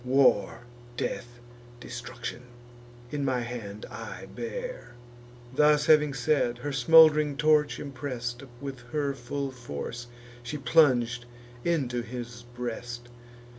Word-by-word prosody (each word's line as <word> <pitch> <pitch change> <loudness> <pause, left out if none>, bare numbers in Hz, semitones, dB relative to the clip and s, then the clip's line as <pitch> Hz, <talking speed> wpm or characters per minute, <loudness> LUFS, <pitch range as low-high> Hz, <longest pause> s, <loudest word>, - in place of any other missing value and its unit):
War, 130 -5 +3 0.4
death, 120 0 -3 0.4
destruction, 120 0 -6 0.7
in 145 -1 -2
my 130 -2 +1
hand 115 -4 -6
I - - -7
bear." - - -6 0.6
Thus 150 0 +5
having 150 -2 +5
said, 125 -2 +1
her 145 +4 -4
smould'ring 150 +1 +6
torch, 150 -1 +3
impress'd 125 -3 -4 0.2
With 135 -2 -6
her 145 -2 0
full 135 +2 -4
force, 120 - -6 0.3
she 120 +5 -5
plung'd 125 -6 +3 0.4
into 135 -8 0
his 120 0 -7
breast. 120 0 -5
130 Hz, 105 wpm, -28 LUFS, 120-145 Hz, 0.7 s, smould'ring